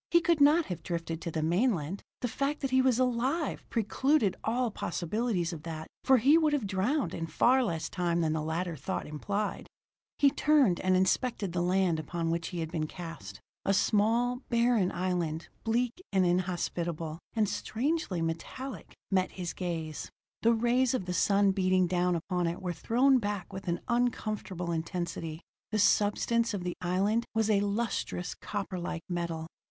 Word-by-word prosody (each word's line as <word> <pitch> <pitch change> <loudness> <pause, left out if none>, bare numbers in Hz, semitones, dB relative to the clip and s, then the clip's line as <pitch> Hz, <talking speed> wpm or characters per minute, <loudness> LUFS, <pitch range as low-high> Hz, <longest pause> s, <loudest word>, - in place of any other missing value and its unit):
He 340 - +6
could 335 -2 +2
not 300 +3 +6
have 180 -4 -5
drifted 165 -1 -4
to - - -3
the 160 -1 -2
mainland; 180 - +1 0.2
the 245 - 0
fact 280 +5 -2
that 270 -2 -1
he 260 0 +5
was 260 -3 +3
alive 255 +5 0
precluded 230 0 +2
all 240 +1 0
possibilities 180 0 -1
of 160 - -7
that, 160 -1 -6 0.2
for 265 -1 +6
he 280 +8 +5
would 310 -2 +2
have 280 -7 0
drowned 205 +10 0
in 165 - -3
far 255 +11 +4
less 165 -8 -2
time 175 -2 0
than 160 -1 +1
the 160 - -1
latter 165 +2 -2
thought 140 - -4
implied. 200 +8 -3 0.5
He 280 -1 +5
turned 280 - +3
and 185 0 +2
inspected 195 0 +1
the 175 - 0
land 180 -2 +2
upon 165 +2 -2
which 165 0 -1
he 175 -2 -4
had 160 0 -4
been 155 -2 -1
cast. 165 - -8 0.2
A 195 - +2
small, 230 +5 +2
barren 235 -5 +3
island, 175 -3 -2
bleak 240 +7 0
and 190 -2 +3
inhospitable, 175 -3 -1 0.2
and 215 -2 +2
strangely 230 - -1
metallic, 170 +11 -5 0.2
met 185 -1 +1
his 180 -3 -4
gaze. 165 -4 -4 0.3
The 230 - +5
rays 245 +3 +2
of 190 - -2
the 180 - -3
sun 195 +3 +3
beating 185 -1 +2
down 180 0 +1
upon 175 +1 -1
it 170 +1 -3
were 180 -2 -3
thrown 250 - +3
back 205 -4 -4
with 190 0 -7
an 170 0 -1
uncomfortable 215 -7 -1
intensity; 165 -1 -3 0.3
the 215 - -1
substance 215 +2 +2
of 185 - -4
the 180 -1 -2
island 195 +6 +1
was 220 -1 +2
a 200 - +4
lustrous, 205 -3 -2
copperlike 180 -4 -4
metal. 170 -2 -3
190 Hz, 170 wpm, -30 LUFS, 170-235 Hz, 0.5 s, He